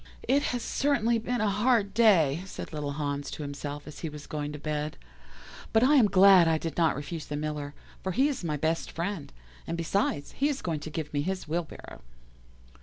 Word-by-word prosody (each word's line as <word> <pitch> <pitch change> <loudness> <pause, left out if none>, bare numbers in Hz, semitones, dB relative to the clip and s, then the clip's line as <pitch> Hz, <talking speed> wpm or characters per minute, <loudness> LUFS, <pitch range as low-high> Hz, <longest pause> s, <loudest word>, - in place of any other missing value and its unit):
"'It 280 +2 +4
has 245 -4 -2
certainly 235 -5 +1
been 240 +1 -2
a 215 - +2
hard 210 0 +2
day,' 175 -9 +4
said 180 - -8
little 145 -2 -3
Hans 145 -1 -3
to 150 - -6
himself 145 0 -6
as 150 - -10
he 165 - -4
was 150 -1 -9
going 150 -1 -4
to 150 - -6
bed, 150 0 -3 0.8
'but 225 +1 +5
I 275 +4 +5
am 255 -7 +6
glad 195 -3 +7
I 160 -1 +3
did 165 0 -4
not 165 -4 +3
refuse 150 +3 -6
the 150 - -4
Miller, 150 -1 -4 0.3
for 190 - -2
he 265 +9 +3
is 280 -9 -3
my 155 -3 -1
best 160 +3 -1
friend, 170 -2 -4 0.4
and, 170 - -2
besides, 165 -3 -1
he 285 +2 0
is 280 -2 -3
going 165 -4 -1
to 150 - -7
give 155 -1 -5
me 145 - +1
his 185 +2 -3
wheelbarrow. 160 - -5
165 Hz, 205 wpm, -28 LUFS, 150-210 Hz, 0.8 s, glad